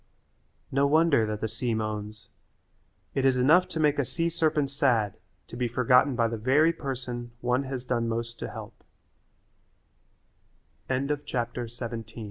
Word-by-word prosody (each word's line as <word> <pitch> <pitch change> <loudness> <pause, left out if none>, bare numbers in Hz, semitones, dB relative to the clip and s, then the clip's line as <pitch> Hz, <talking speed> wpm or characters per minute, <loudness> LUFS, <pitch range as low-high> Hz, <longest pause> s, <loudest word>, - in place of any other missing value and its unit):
No 140 +1 +3
wonder 150 -6 +4
that 105 0 -4
the 110 - 0
sea 115 +1 -2
moans. 110 -1 -5 0.8
It 135 - 0
is 135 -1 +4
enough 155 +9 +5
to 160 - -5
make 150 -2 +3
a - - +3
sea 165 +6 -1
serpent 155 -4 +1
sad 120 -8 +1 0.3
to - - -11
be 125 0 0
forgotten 125 +3 +3
by 115 -1 +2
the 115 -1 -4
very 145 +8 +4
person 125 -5 -5
one 125 +2 +1
has 130 -2 -4
done 120 -2 -1
most 115 0 -3
to - - -4 2.4
he 120 -4 -3
125 Hz, 135 wpm, -27 LUFS, 115-140 Hz, 2.4 s, enough